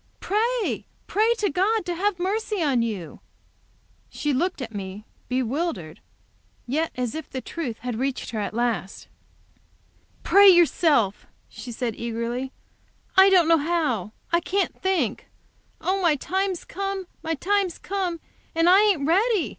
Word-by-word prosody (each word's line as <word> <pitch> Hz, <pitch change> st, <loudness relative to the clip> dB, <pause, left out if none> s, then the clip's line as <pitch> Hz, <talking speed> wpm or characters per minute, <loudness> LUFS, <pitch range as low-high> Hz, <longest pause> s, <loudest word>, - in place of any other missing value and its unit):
"Pray, 455 Hz, +3 st, -1 dB, 0.2 s
pray 435 Hz, +3 st, +2 dB
to 415 Hz, -5 st, 0 dB
God 395 Hz, +5 st, +1 dB
to 355 Hz, -, -2 dB
have 385 Hz, +2 st, 0 dB
mercy 415 Hz, +3 st, -1 dB
on 270 Hz, -5 st, +2 dB
you!" 205 Hz, -8 st, -4 dB, 0.9 s
She 295 Hz, -1 st, -2 dB
looked 345 Hz, +7 st, 0 dB
at 230 Hz, -4 st, -6 dB
me, 200 Hz, +1 st, -6 dB, 0.2 s
bewildered, 250 Hz, -, -2 dB, 0.7 s
but 245 Hz, -, -5 dB
yet 320 Hz, +2 st, 0 dB
as 250 Hz, -2 st, -2 dB
if 315 Hz, -1 st, -6 dB
the 260 Hz, -, -4 dB
truth 255 Hz, -5 st, -5 dB
had 245 Hz, -2 st, -4 dB
reached 270 Hz, -2 st, -2 dB
her 220 Hz, -, -3 dB
at 210 Hz, +1 st, -3 dB
last. 230 Hz, -5 st, -2 dB, 1.2 s
"Pray 400 Hz, 0 st, +7 dB
yourself!" 315 Hz, -, +3 dB, 0.2 s
she 245 Hz, -, -9 dB
said, 235 Hz, -1 st, -3 dB
eagerly. 235 Hz, +3 st, -3 dB, 0.6 s
"I 385 Hz, +1 st, +8 dB
don't 360 Hz, -4 st, +5 dB
know 330 Hz, -1 st, +5 dB
how. 290 Hz, -, -1 dB, 0.2 s
I 340 Hz, -, +4 dB
can't 380 Hz, +3 st, -1 dB
think. 370 Hz, -, 0 dB, 0.5 s
Oh, 385 Hz, +1 st, 0 dB
my 335 Hz, -4 st, +4 dB
time's 375 Hz, +5 st, -2 dB
come 390 Hz, 0 st, -4 dB, 0.2 s
my 325 Hz, 0 st, -2 dB
time's 385 Hz, +3 st, 0 dB
come! 370 Hz, -3 st, -3 dB, 0.4 s
And 330 Hz, +1 st, +3 dB
I 375 Hz, +3 st, +7 dB
ain't 390 Hz, -10 st, +2 dB
ready! 385 Hz, -, +2 dB
330 Hz, 145 wpm, -24 LUFS, 245-380 Hz, 1.2 s, I